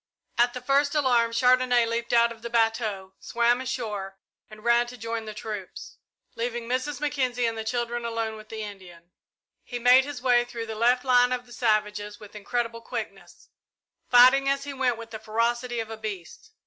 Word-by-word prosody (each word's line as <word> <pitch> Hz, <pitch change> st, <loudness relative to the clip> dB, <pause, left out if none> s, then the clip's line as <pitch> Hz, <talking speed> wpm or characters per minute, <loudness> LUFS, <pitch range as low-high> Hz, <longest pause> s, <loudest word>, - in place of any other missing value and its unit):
At 240 Hz, +1 st, +2 dB
the 250 Hz, -, -5 dB
first 280 Hz, +3 st, +2 dB
alarm, 245 Hz, -5 st, +3 dB
Chandonnais 250 Hz, 0 st, +3 dB
leaped 230 Hz, +1 st, -3 dB
out 235 Hz, 0 st, +4 dB
of 225 Hz, -1 st, -11 dB
the 235 Hz, -, -6 dB
bateau, 225 Hz, -4 st, 0 dB
swam 240 Hz, +1 st, +1 dB
ashore 210 Hz, -7 st, -4 dB, 0.3 s
and 215 Hz, 0 st, -13 dB
ran 235 Hz, 0 st, +3 dB
to 250 Hz, +1 st, -10 dB
join 230 Hz, 0 st, -4 dB
the 215 Hz, -, -7 dB
troops, 210 Hz, -3 st, -7 dB, 0.4 s
leaving 235 Hz, 0 st, -4 dB
Mrs. 255 Hz, +4 st, -2 dB
Mackenzie 260 Hz, -5 st, -1 dB
and 230 Hz, -1 st, -1 dB
the 220 Hz, -, -4 dB
children 240 Hz, +1 st, -2 dB
alone 225 Hz, -1 st, -3 dB
with 215 Hz, 0 st, -13 dB
the 220 Hz, -1 st, -5 dB
Indian. 180 Hz, -4 st, -11 dB, 0.5 s
He 245 Hz, -, -6 dB
made 250 Hz, +2 st, +6 dB
his 285 Hz, -1 st, -6 dB
way 245 Hz, -1 st, +3 dB
through 240 Hz, -1 st, -6 dB
the 225 Hz, -, -6 dB
left 245 Hz, +4 st, +2 dB
line 245 Hz, -1 st, +4 dB
of 250 Hz, -1 st, -2 dB
the 240 Hz, -, -14 dB
savages 210 Hz, -3 st, -1 dB
with 210 Hz, -1 st, -13 dB
incredible 230 Hz, +2 st, -3 dB
quickness, -, -, -8 dB, 0.6 s
fighting 255 Hz, +3 st, +6 dB
as 275 Hz, 0 st, 0 dB
he 285 Hz, 0 st, -6 dB
went 255 Hz, -3 st, 0 dB
with 230 Hz, 0 st, -10 dB
the 220 Hz, -, -6 dB
ferocity 235 Hz, +2 st, -1 dB
of 225 Hz, 0 st, -5 dB
a 225 Hz, -, -6 dB
beast. 205 Hz, -, -7 dB
235 Hz, 185 wpm, -26 LUFS, 220-250 Hz, 0.6 s, made